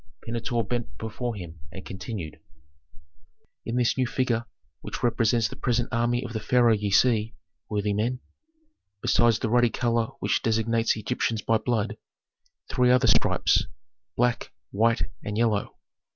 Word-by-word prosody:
Pentuer 115 +1 -1
bent 120 +2 -4
before 115 +1 -4
him 85 -4 -9
and 95 +2 -9
continued, 95 -4 -6 1.3
"In 115 - -2
this 125 +1 +1
new 130 - +2
figure 120 -2 0 0.4
which - - -6
represents 115 -1 +2
the 130 - -9
present 125 -2 0
army 120 +1 +1
of 120 - -7
the 110 - -2
pharaoh 120 +1 +4
ye 105 -1 -1
see, 110 +1 +3 0.3
worthy 105 -1 0
men, 120 +5 -1 0.8
besides 120 -2 +4
the 110 - -2
ruddy 120 0 +4
color 115 0 0
which - - 0
designates 115 0 +1
Egyptians 110 0 -2
by 115 -1 +2
blood, 110 -3 -1 0.7
three 125 -1 +2
other 125 0 +4
stripes, - - +3 0.5
black, 120 0 +1 0.2
white, 115 +3 +2 0.2
and 105 0 -4
yellow. 110 -3 0
115 Hz, 140 wpm, -26 LUFS, 110-120 Hz, 1.3 s, pharaoh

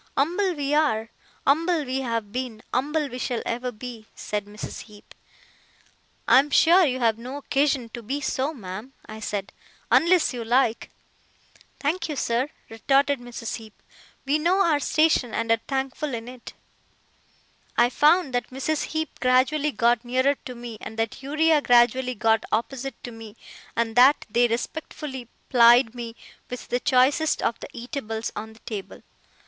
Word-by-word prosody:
Umble 355 +6 +1
we 285 -1 -2
are, 230 -8 +1 0.3
umble 320 +2 +2
we 260 +1 -2
have 230 -5 -3
been, 245 -2 -5
umble 295 +4 0
we 250 - -7
shall 245 -2 -2
ever 245 +2 -2
be,' 230 -1 -9
said 210 -1 -4
Mrs. 210 +1 -8
Heep. 210 -2 -16 1.1
'I 255 - +7
am 285 +2 +1
sure 345 +6 +6
you 255 -1 -1
have 230 -2 +2
no 255 +4 -6
occasion 275 -3 0
to 235 +1 -8
be 265 +6 -3
so, 270 +1 -1
ma'am,' 215 -1 -8
I 215 0 -9
said, 205 -2 -4 0.4
'unless 340 -3 +4
you 240 -2 -4
like.' 235 0 +1 0.9
'Thank 330 +3 -1
you, 300 - -3
sir,' 250 +1 0 0.2
retorted 275 +5 +1
Mrs. 240 -1 -6
Heep. 220 -2 -14 0.5
'We 290 +3 +2
know 365 +5 +3
our 310 -3 +3
station 310 -5 +2
and 230 0 -1
are 230 0 +3
thankful 270 0 -2
in 230 0 -7
it.' 250 -1 -10 1.2
I 240 +1 +4
found 300 0 +3
that 245 - -1
Mrs. 275 +4 -2
Heep 315 -2 -4
gradually 265 +4 +2
got 235 0 +2
nearer 260 +3 +2
to 250 - -7
me, 235 -2 -8
and 220 - -8
that 225 +3 -2
Uriah 305 +2 +2
gradually 250 0 +3
got 225 +1 +2
opposite 245 +3 -2
to 245 - -6
me, 225 -1 -11 0.4
and 230 -1 -1
that 260 +4 +6
they 240 +2 +4
respectfully 260 +1 -5 0.2
plied 240 -1 +6
me 235 -2 -7 0.3
with 250 - -7
the 245 - 0
choicest 280 +5 +2
of 230 - 0
the - - -9
eatables 235 -3 -5
on 220 +1 -6
the 220 - -19
table. 205 -4 -7
250 Hz, 160 wpm, -25 LUFS, 230-285 Hz, 1.2 s, I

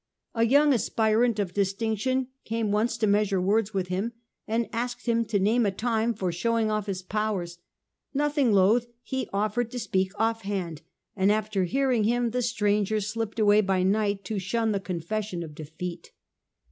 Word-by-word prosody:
^ - - -60 0.4
A - - +5
young 285 +3 +5
aspirant 225 0 +2
of 195 -4 -2
distinction 220 +6 0
came 225 -2 -1
once 220 +2 +1
to 220 - +1
measure 205 -2 +2
words 205 +3 +1
with 190 -3 -2
him, 195 +6 -2 0.3
and 230 +1 0
asked 240 +2 -3
him 230 -1 +2
to 210 -1 0
name 215 +5 +3
a 205 - +3
time 225 +3 0
for 185 -3 -1
showing 220 +5 0
off 215 -1 -1
his 190 -2 -3
powers. 190 -4 -2 0.5
Nothing 290 -3 +1
loth, 210 +5 +4 0.2
he 260 -2 -3
offered 215 +4 0
to 250 - -6
speak 190 -5 0
offhand, 200 -8 -1 0.3
and 195 0 +3
after 210 -3 0
hearing 255 +1 +1
him 240 +1 +1
the 250 +2 0
stranger 210 -3 +1
slipped 215 +2 -3
away 210 -1 +5
by 190 -2 +1
night 200 0 +1
to 210 +1 -2
shun 220 +4 0
the 200 - 0
confession 185 +1 -3
of 155 -2 -9
defeat. 165 +3 -7
215 Hz, 170 wpm, -27 LUFS, 195-230 Hz, 0.5 s, A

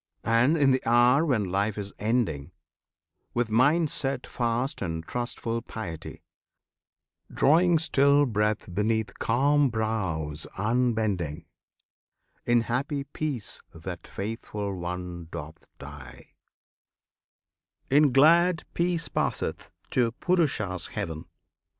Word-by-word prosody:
And, 115 +8 +3
in 140 -3 +4
the 130 - +2
hour 120 +5 +4
when 130 -10 +1
life 100 +2 0
is 100 -1 -5
ending, 105 - -1 0.8
With 120 -2 0
mind 145 +7 +3
set 135 -2 -3
fast 120 +3 -2
and 80 -3 -3
trustful 115 0 -3
piety, 95 -9 -7 1.1
Drawing 170 +4 +4
still 140 -2 +4
breath 105 -5 -1
beneath 110 +2 -1
calm 140 +4 +3
brows 95 -10 -2
unbending, 105 - 0 1.0
In 120 0 +4
happy 140 +5 -2
peace 140 -6 -5
that 85 +1 -7
faithful 105 -1 -4
one 90 -1 -5
doth 80 +3 -8
die, 70 -4 -12 1.6
In 145 0 +5
glad 165 +5 +5
peace 170 -2 0
passeth - - -2 0.2
to 120 -2 +1
Purusha's 120 - 0
heaven. 85 -7 -5
115 Hz, 100 wpm, -27 LUFS, 95-140 Hz, 1.6 s, In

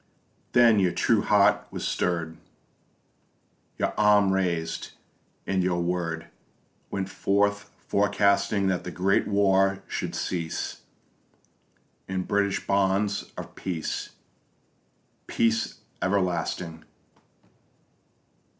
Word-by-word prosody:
Then 115 -3 +6
your 90 -2 +2
true - - +2
heart - - +3
was - - -4
stirr'd, 85 -2 -1 1.4
Your - - -1
arm 105 -2 +5
raised, 85 -4 -2 0.5
and 95 -1 0
your 90 -1 0
word 85 -2 -2 0.6
Went 95 -1 -3
forth, 100 +1 0 0.2
forecasting 100 0 +2
That 95 -2 0
the - - -5
great 95 +2 +1
war 95 -1 +2
should - - -4
cease 85 -3 -3 1.3
In 95 0 -2
British 100 +1 0
bonds 100 +1 +1
of - - -7
peace, 85 -4 -4 1.2
Peace 115 -1 +1 0.3
everlasting. 90 -3 -1
95 Hz, 90 wpm, -26 LUFS, 90-100 Hz, 1.4 s, Then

